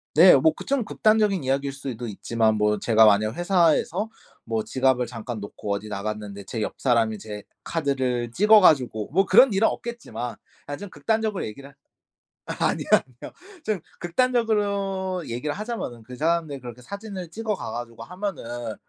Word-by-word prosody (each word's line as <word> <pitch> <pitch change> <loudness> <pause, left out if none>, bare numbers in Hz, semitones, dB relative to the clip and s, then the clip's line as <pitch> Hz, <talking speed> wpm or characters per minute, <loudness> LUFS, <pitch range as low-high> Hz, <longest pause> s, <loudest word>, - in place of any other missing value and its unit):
네 175 +2 +9
뭐 155 +4 +4
그 - - -9
좀 270 -5 0
극단적인 215 -6 +2
이야기일 135 +1 -1
수도 125 -4 -6
있지만 110 +1 0
뭐 105 0 +2
제가 110 +1 +5
만약 105 +1 +4
회사에서 175 +3 +2 0.4
뭐 110 -2 -1
지갑을 130 -2 +1
잠깐 115 -1 -6
놓고 100 0 -6
어디 100 +2 -4
나갔는데 105 0 -5
제 115 - -4
옆 - - -3
사람이 115 -4 +2
제 105 0 -8 0.2
카드를 130 -6 -1
찍어 210 - +6
가지고 125 - +3
뭐 195 +6 +3
그런 240 +7 +6
일은 205 +3 +4
없겠지만 125 - -5 0.3
아 145 - -4
좀 205 0 -8
극단적으로 220 -3 -1
얘기를 140 +6 -10 0.7
아니요 - - -1
아니요. 125 -2 0 0.3
좀 215 -3 0 0.2
극단적으로 200 -3 0
얘기를 125 +6 -3
하자면은 210 - -5
그 125 +3 -10
사람들이 160 -1 0
그렇게 120 0 -9
사진을 200 - -7
찍어 220 +3 -3
가 - - -6
가지고 120 -1 -7
하면은 120 - -5
140 Hz, 355 characters per minute, -24 LUFS, -, 0.7 s, 네